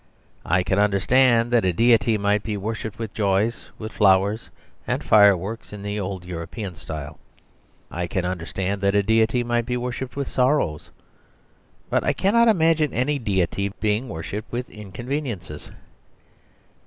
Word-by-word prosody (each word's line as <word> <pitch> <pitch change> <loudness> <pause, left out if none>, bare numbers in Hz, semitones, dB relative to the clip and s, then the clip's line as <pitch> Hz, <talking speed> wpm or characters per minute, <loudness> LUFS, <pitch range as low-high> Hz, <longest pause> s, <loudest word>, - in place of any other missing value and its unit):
I 90 +2 +2
can 95 +1 0
understand 115 +4 +3
that 120 -2 +3
a 95 - +2
deity 115 +3 +3
might 100 0 +1
be 105 -1 -3
worshipped 110 +1 -5
with 115 -3 -5
joys, 105 +2 0
with 110 0 -7
flowers, 100 +2 +2 0.4
and - - -1
fireworks 105 +1 +3
in 100 -1 -8
the 100 +1 -3
old 95 -2 -5
European 90 +3 -6
style. 75 -1 -8 0.7
I 90 0 -3
can 90 +1 -2
understand 90 +3 -3
that 100 0 +2
a 100 - +3
deity 110 +3 +2
might 120 0 -1
be 125 - -1
worshipped 125 +1 -5
with 140 -2 -3
sorrows. 125 - 0 1.0
But - - +2
I - - +1
cannot 235 +5 +3
imagine 165 - +3
any 140 +5 0
deity 100 -2 -1
being 110 +4 0
worshipped 95 +6 -6
with 125 +1 -4
inconveniences. 105 - -6
105 Hz, 145 wpm, -23 LUFS, 95-120 Hz, 1.0 s, understand